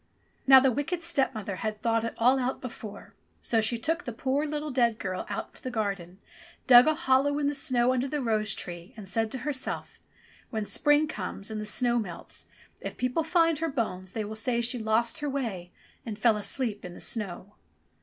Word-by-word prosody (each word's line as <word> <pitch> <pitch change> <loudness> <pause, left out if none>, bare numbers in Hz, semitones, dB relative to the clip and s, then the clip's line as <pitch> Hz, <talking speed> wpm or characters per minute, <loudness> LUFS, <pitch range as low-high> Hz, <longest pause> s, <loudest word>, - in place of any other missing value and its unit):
Now 265 0 +10
the 265 0 +3
wicked 330 +7 -2
stepmother 265 - -1
had 215 +1 -3
thought 230 0 +1
it 230 - -3
all 255 +3 +4
out 255 +1 -1
before, 225 -4 -9 0.3
so 225 -1 +1
she 225 +2 +1
took 325 +9 -1
the 245 - -4
poor 270 +6 -1
little 300 0 -3
dead 235 -4 +2
girl 185 -3 -4
out - - -4
to - - -9
the 255 - -3
garden, 200 -6 -3 0.5
dug 245 +1 +9
a 310 - +3
hollow 285 -2 +2
in 295 - 0
the 285 - +1
snow 255 -2 +2
under 255 +1 0
the 295 +2 -2
rose 215 -4 0
tree, 175 +7 -7
and 205 -3 -9
said 225 +4 0
to 260 - -4
herself, 280 -3 -3 0.5
*'When 220 -3 -2
spring 295 +7 +3
comes 200 -4 -5
and 215 -1 -3
the - - -4
snow 240 +2 +2
melts, 185 -6 -4 0.3
if - - -6
people 250 +6 0
find 330 -1 +3
her 330 0 0
bones, 185 -8 -3
they 220 -2 -2
will 210 - -6
say 235 +2 0
she 235 +1 +1
lost 225 +1 +1
her 295 -1 -2
way 220 -11 -3 0.3
and 220 -3 -5
fell 225 0 +4
asleep 210 0 -2
in 180 -1 -8
the - - -10
snow.' 205 -2 -3
235 Hz, 205 wpm, -28 LUFS, 215-275 Hz, 0.5 s, Now